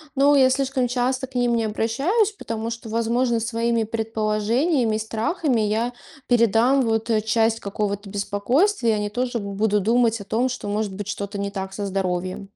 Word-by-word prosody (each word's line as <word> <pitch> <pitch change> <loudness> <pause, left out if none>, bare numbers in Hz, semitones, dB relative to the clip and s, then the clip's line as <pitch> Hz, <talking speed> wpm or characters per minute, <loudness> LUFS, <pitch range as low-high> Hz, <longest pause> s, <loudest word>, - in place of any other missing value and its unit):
но 280 +2 +5
я 260 -1 +6
слишком 260 -1 0
часто 255 +1 -1
к 255 - -23
ним 240 -1 +2
не 225 - 0
обращаюсь, 275 - +1
потому 230 - -5
что, 230 0 -7
возможно, 230 +1 0
своими 230 0 0
предположениями 225 +4 0
и - - -1
страхами 230 +5 -1
я 220 +3 0 0.4
передам 240 +3 +3
вот, 225 0 -1
э, 215 -1 +2
часть 225 +1 +1
какого-то 205 0 -3
беспокойствия 230 - +1
и - - +2
они 210 0 -2
тоже 245 +1 -2
будут 205 0 0
думать 230 -1 +2
о - - -6
том, 225 +6 0
что 245 -5 -5
может 205 -1 -2
быть 205 0 -6
что-то 200 0 -4
не 200 0 -3
так 190 -1 -5
со 205 - -4
здоровьем. 185 0 -2
225 Hz, 175 wpm, -23 LUFS, 210-245 Hz, 0.4 s, я